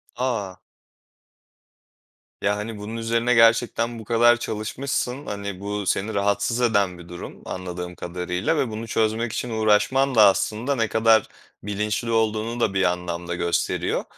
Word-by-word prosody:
A! 115 -7 -2 1.8
Ya, 105 0 +1
hani, 105 +1 -5
bunun 105 +2 -6
üzerine 115 +1 +1
gerçekten 115 0 +3
bu 110 - -10
kadar 120 +1 +5
çalışmışsın. 125 +5 -3
Hani, 100 -2 -5
bu 100 0 -4
seni 105 +4 0
rahatsız 100 +4 0
eden 100 -6 +2
bir 85 0 -13
durum 90 0 -9
anladığım 90 -1 -6
kadarıyla 90 - -2
ve 135 -5 0
bunu 110 +1 -6
çözmek 110 +1 0
için 125 - -3
uğraşman 110 +5 +2
da 110 - +8
aslında 110 +7 +1
ne 115 -3 +1
kadar 110 -1 +4 0.4
bilinçli 105 +3 -2
olduğunu 110 +1 0
da 110 -4 +1
bir 95 0 +2
anlamda 90 -1 -2
gösteriyor. 85 0 -1
110 Hz, 140 wpm, -23 LUFS, 100-115 Hz, 1.8 s, da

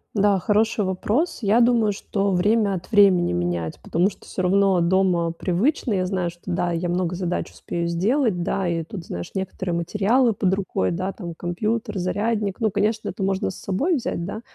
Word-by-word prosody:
Да, 200 -1 +3
хороший 215 +2 +1
вопрос. 215 - -1
Я 210 +4 +4
думаю, 235 -3 +4
что 200 0 -1
время 205 +2 +2
от 180 +4 -6
времени 195 - +5
менять, 85 -2 -2
потому 175 +5 +1
что - - -16
всё 185 - -4
равно 190 0 +3
дома 175 -1 +2
привычно. 210 - 0
Я 185 -1 +1
знаю, 180 -2 -1
что 175 - -21
да, 175 -1 -1
я 170 +1 -1
много 180 0 -1
задач 180 -1 -3
успею 170 0 -4
сделать, 200 - +1
да, 190 +1 -1
и 165 -1 -1
тут, 170 +1 -8
знаешь, 85 0 -6
некоторые 185 -2 -3
материалы 210 +8 +2
под 190 -2 +1
рукой, 190 - -1
да, 185 +3 -2
там, 170 -5 -8
компьютер, 210 +5 -2
зарядник. 205 +3 -1
Ну, 220 -3 +1
конечно, 215 +2 0
это - - -7
можно 195 0 0
с - - -10
собой 280 - 0
взять, 175 -9 -3
да, 215 +4 -5
190 Hz, 185 wpm, -23 LUFS, 175-210 Hz, -, времени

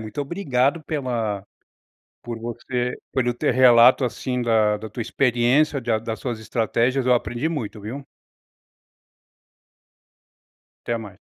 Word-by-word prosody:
muito 110 +7 -6
obrigado 140 -2 0
pela 120 -9 -2 0.8
por 120 -1 -6
você 120 +2 -3 0.2
pelo 125 -2 0
teu 120 - 0
relato, 125 +1 +6
assim, 125 +1 -2
da 110 -2 +2
da 110 +1 -8
tua 110 +3 -8
experiência, 130 +4 +2
de 120 -1 -4
a 110 - +3
das 110 0 -5
suas 120 -4 -3
estratégias, 115 +4 0
eu 125 - +3
aprendi 120 +5 0
muito, 115 -9 -5
viu. 130 +7 -7 2.8
Até 120 - 0
mais. 105 -4 -10
120 Hz, 125 wpm, -23 LUFS, 115-130 Hz, 2.8 s, relato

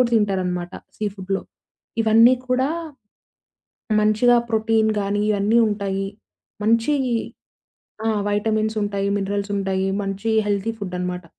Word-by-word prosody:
కూడా 240 -1 +3
తింటారనమాట 185 -4 -1 0.2
సీ 215 - -3
ఫుడ్‌లో. 195 0 -3 0.6
ఇవన్నీ 225 +3 +6
కూడా, 260 +3 +1 1.3
మంచిగా 215 +3 +4
ప్రోటీన్ 220 0 +2
గానీ, 205 +1 0
ఇయన్నీ 210 +3 +2
ఉంటాయి. 195 -2 -2 0.6
మంచి, 230 +6 +3 1.1
ఆ! - - +3 0.2
వైటమిన్సుంటాయి, 210 -1 0
మిన్రల్సుంటాయి. 195 -1 -1
మంచి 195 +3 -2 0.2
హెల్తీ 205 +2 0
ఫుడ్డనమాట. 180 -2 -4
205 Hz, 95 wpm, -22 LUFS, 195-220 Hz, 1.3 s, ఇవన్నీ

